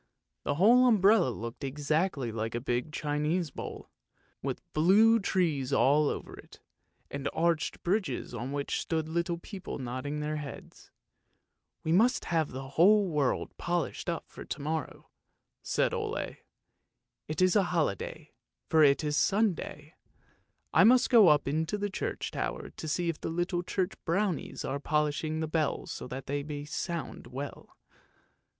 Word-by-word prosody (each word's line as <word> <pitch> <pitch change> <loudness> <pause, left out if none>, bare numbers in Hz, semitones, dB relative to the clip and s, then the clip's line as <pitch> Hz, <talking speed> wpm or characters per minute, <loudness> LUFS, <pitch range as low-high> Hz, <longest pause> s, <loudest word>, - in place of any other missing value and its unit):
" - - -56
The 145 - 0
whole 240 - +6
umbrella 205 - +5
looked 115 +3 -6
exactly 145 -1 -1
like 110 +1 -3
a - - 0
big 125 +3 -2
Chinese 150 +2 -1
bowl, - - -8 0.5
with - - -4
blue 210 +8 +5
trees 160 - 0
all 145 +2 +4
over - - -5
it, - - -15 0.5
and 140 0 -2
arched 165 -2 0
bridges 180 - -1
on 120 +3 -4
which 140 0 -2
stood 160 -1 -2
little 170 +1 -1
people 190 +2 -7
nodding 130 +3 -4
their 150 +1 -2
heads. 145 -2 -9 0.5
" - - -53
We 160 - -1
must 230 +8 +3
have 165 -3 +1
the 135 +1 -7
whole 195 +7 +5
world 145 -4 0
polished 175 0 -2
up 170 - -3
for - - -10
to - - -6
morrow," 155 +1 -4 0.5
said - - 0
Ole; - - -3 0.5
" - - -55
it 155 - -3
is 185 +1 +4
a 200 -3 +4
holiday, 155 - -2 0.4
for 160 - +5
it 140 +1 +4
is 150 -1 0
Sunday. 180 -6 0 0.8
I - - +6
must 255 +3 +5
go 225 -6 +8
up 150 -3 +4
into 160 +7 0
the 205 0 -2
church - - -3
tower - - -4
to 160 - -8
see 170 +3 0
if 165 -2 -2
the - - -3
little 175 +2 -1
church 180 +1 -1
brownies 185 0 -1
are 140 - -2
polishing 150 +1 0
the 160 - -1
bells 155 -1 -1
so - - -6
that 130 +1 -6
they 145 +1 -2
may 145 0 -6
sound 170 +2 -4
well. 140 +2 -8
155 Hz, 160 wpm, -30 LUFS, 140-180 Hz, 0.8 s, go